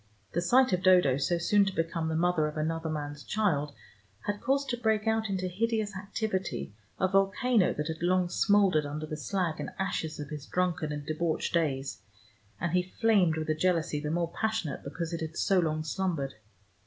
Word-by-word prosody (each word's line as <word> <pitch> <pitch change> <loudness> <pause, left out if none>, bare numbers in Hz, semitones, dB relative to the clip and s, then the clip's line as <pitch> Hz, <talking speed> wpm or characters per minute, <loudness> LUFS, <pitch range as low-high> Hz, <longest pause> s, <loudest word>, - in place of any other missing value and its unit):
The 175 - 0
sight 250 +7 +4
of 180 - +1
Dodo 180 -8 +5
so 170 +5 +1
soon 200 +4 +4
to 195 - -3
become 165 0 -1
the 160 - -1
mother 165 -2 +2
of 150 - -6
another 160 +1 -1
man's 145 -1 -4
child 160 -9 0 0.5
had 205 0 -3
caused 275 +1 +1
to 240 - -1
break 220 -2 +1
out 220 -1 +1
into 185 -1 -1
hideous 215 +2 -1
activity 190 - -3 0.3
a 190 - +3
volcano 195 +3 +3
that 150 - -2
had 160 0 -5
long 180 +1 +2
smoldered 195 -4 +3
under 150 +2 -4
the 155 - -5
slag 170 +1 -2
and - - -3
ashes 165 -5 -2
of 145 -1 -6
his 150 -2 -7
drunken 175 -4 0
and 145 -1 -5
debauched 160 +1 -1
days, 140 -5 -1 0.6
and 170 0 -1
he 180 +1 +3 0.2
flamed 200 -8 +4
with 155 0 -3
a - - +4
jealousy 165 -2 +1
the 150 0 -3
more 170 +1 -1
passionate 220 -9 -2
because 165 +4 -4
it 165 - -3
had 160 +1 -5
so 195 -2 +3
long 155 -2 0
slumbered. 160 -4 -2
175 Hz, 190 wpm, -29 LUFS, 155-195 Hz, 0.6 s, Dodo